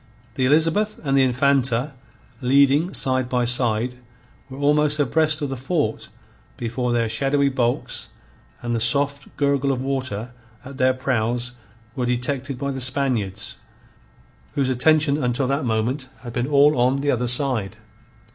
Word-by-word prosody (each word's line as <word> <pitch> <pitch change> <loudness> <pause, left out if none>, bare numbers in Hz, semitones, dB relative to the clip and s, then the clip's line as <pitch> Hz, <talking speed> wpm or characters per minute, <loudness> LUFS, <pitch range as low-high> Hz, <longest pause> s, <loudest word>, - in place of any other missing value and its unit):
The 130 - 0
Elizabeth 165 +9 +2
and 135 -2 0
the 135 - +5
Infanta, 130 0 +1 0.5
leading 140 +6 +3
side 130 -1 0
by 125 -1 +1
side, 125 0 0 0.5
were 130 - -9
almost 150 +1 +2
abreast 155 +3 +2
of 145 - -2
the 135 - -3
fort 145 +5 -2 0.5
before 120 +1 -2
their 120 -1 +1
shadowy 140 +5 +1
bulks 125 -3 -1 0.5
and 120 0 -2
the 115 - 0
soft 140 +4 +1
gurgle 140 -1 +1
of 130 - -1
water 130 -4 -3 0.3
at 135 +1 -10
their 130 0 +3
prows 125 -1 -1 0.4
were 125 -3 -1
detected 125 +2 -2
by 140 +2 -3
the 135 -1 -4
Spaniards, 125 -7 -1 1.0
whose 135 -2 +1
attention 145 +2 +2
until 125 +2 0
that 140 +2 -1
moment 120 +4 -1
had 120 -1 -8
been 120 +1 -1
all 145 +1 +5
on 130 +3 +2
the 145 0 +1
other 125 0 0
side. 125 -5 +1
130 Hz, 145 wpm, -22 LUFS, 125-140 Hz, 1.0 s, the